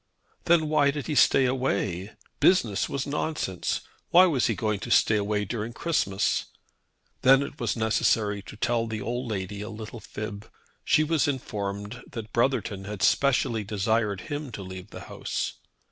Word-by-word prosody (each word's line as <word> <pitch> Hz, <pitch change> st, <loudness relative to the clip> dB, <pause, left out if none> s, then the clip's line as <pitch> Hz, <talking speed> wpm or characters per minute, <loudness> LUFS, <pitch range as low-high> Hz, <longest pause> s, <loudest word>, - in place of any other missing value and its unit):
Then 165 Hz, -2 st, +4 dB
why 150 Hz, -2 st, +3 dB
did 145 Hz, -1 st, -3 dB
he 155 Hz, -, -2 dB
stay 135 Hz, -1 st, +5 dB
away? 105 Hz, -7 st, -1 dB, 0.3 s
Business 115 Hz, -, +3 dB
was 140 Hz, -1 st, -2 dB
nonsense. 145 Hz, -, -2 dB, 0.3 s
Why 180 Hz, +2 st, +8 dB
was 145 Hz, -9 st, +2 dB
he 115 Hz, -, 0 dB
going 105 Hz, +1 st, -1 dB
to 120 Hz, -, -6 dB
stay 115 Hz, -1 st, +4 dB
away 105 Hz, 0 st, 0 dB
during 110 Hz, +2 st, -4 dB
Christmas. 110 Hz, -, 0 dB, 0.8 s
Then 135 Hz, +1 st, +6 dB
it 140 Hz, +1 st, -8 dB
was 120 Hz, -4 st, -1 dB
necessary 110 Hz, -2 st, +1 dB
to -, -, -10 dB
tell 115 Hz, 0 st, 0 dB
the 110 Hz, -1 st, -4 dB
old 120 Hz, +2 st, -3 dB
lady 100 Hz, -1 st, -4 dB
a 105 Hz, -, -5 dB
little 110 Hz, +1 st, -8 dB
fib. 105 Hz, 0 st, -7 dB, 0.3 s
She 155 Hz, -, +4 dB
was 155 Hz, -1 st, +1 dB
informed 105 Hz, -4 st, -4 dB
that 110 Hz, -3 st, -7 dB
Brotherton 115 Hz, -5 st, 0 dB
had 105 Hz, -2 st, -5 dB
specially 125 Hz, -5 st, +2 dB
desired 105 Hz, -1 st, 0 dB
him 145 Hz, 0 st, -5 dB
to 100 Hz, -, -6 dB
leave 95 Hz, 0 st, -8 dB
the -, -, -9 dB
house. -, -, -4 dB
115 Hz, 160 wpm, -27 LUFS, 105-135 Hz, 0.8 s, Why